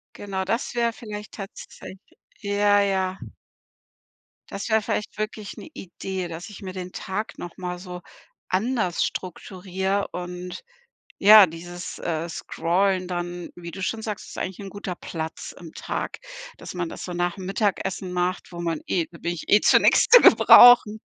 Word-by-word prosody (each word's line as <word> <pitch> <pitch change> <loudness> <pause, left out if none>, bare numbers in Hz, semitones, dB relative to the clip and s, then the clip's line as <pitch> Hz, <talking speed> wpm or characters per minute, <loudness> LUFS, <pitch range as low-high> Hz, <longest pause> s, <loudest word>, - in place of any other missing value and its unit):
Genau, 190 -2 -4
das 230 +6 -2
wär 235 -1 +1
vielleicht 210 -2 -8
tatsäch 195 -1 -10 0.4
ja, 205 0 +3
ja. 190 -1 0 1.3
Das 200 +3 -5
wär 220 0 +3
vielleicht 210 0 -3
wirklich 215 -1 -5
'ne - - -9
Idee, 190 0 -5
dass 170 +5 -8
ich 205 - -11
mir 185 -1 -7
den 185 -1 -6
Tag 200 +3 -5
noch 175 -1 -8
mal 180 -1 -5
so 180 -1 -8 0.5
anders 210 -2 0
strukturiere 190 +2 -3
und, 180 - -6 0.6
ja, 210 0 +9
dieses, 175 +2 -8
äh, 165 0 -2
Scrollen 185 +3 0
dann, 175 0 -5
wie 170 -1 -9
du 195 +3 -8
schon 220 +4 -2
sagst 210 -2 -5
ist - - -10
eigentlich 190 +2 -5
guter 195 -2 -6
Platz 160 -2 -6
im 165 -3 -11
Tag, - - -4 0.4
dass - - -9
man 175 -2 -2
das - - -8
so 180 - -5
nachm 175 +2 -2
Mittagessen 195 -2 -1
macht, 180 +1 -2
wo 170 - -7
man 165 -2 -2
eh 170 -3 0
da 170 - -14
bin 170 - -2
ich 175 - -8
eh 210 - +6
zu - - +6
nix - - +4
zu - - +10
gebrauchen. 240 -3 +8
190 Hz, 160 wpm, -24 LUFS, 175-205 Hz, 1.3 s, zu